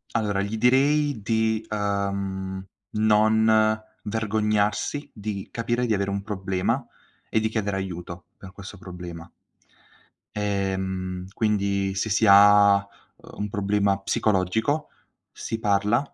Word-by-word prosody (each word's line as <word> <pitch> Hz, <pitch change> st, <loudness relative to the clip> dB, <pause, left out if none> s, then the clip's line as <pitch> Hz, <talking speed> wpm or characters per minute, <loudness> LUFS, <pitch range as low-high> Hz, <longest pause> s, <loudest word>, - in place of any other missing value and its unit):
Allora 105 Hz, -3 st, 0 dB
gli 100 Hz, +2 st, -3 dB
direi 140 Hz, +2 st, +3 dB
di, 110 Hz, 0 st, 0 dB
ehm, 100 Hz, -2 st, -2 dB, 0.3 s
non 110 Hz, 0 st, +3 dB, 0.2 s
vergognarsi, 105 Hz, +5 st, -1 dB
di 105 Hz, -2 st, -6 dB
capire 120 Hz, +1 st, -1 dB
di 110 Hz, -, +1 dB
avere 100 Hz, 0 st, -1 dB
un 100 Hz, -, -2 dB
problema 100 Hz, +4 st, -2 dB, 0.4 s
e 110 Hz, -, +2 dB
di 110 Hz, 0 st, 0 dB
chiedere 105 Hz, -3 st, -2 dB
aiuto 90 Hz, -2 st, -6 dB
per 95 Hz, -, -11 dB
questo 100 Hz, +1 st, -10 dB
problema. 90 Hz, -2 st, -9 dB, 1.1 s
Ehm, 95 Hz, -2 st, -2 dB
quindi 100 Hz, -3 st, 0 dB
se 95 Hz, +3 st, -2 dB
si 110 Hz, +2 st, +2 dB
ha, 100 Hz, 0 st, +7 dB
uhm, 100 Hz, -, -3 dB, 0.5 s
un 105 Hz, 0 st, -4 dB
problema 100 Hz, -1 st, +1 dB
psicologico, 110 Hz, -, 0 dB, 0.4 s
si 115 Hz, -, -5 dB
parla, 105 Hz, +3 st, +2 dB
105 Hz, 115 wpm, -25 LUFS, 95-110 Hz, 1.1 s, ha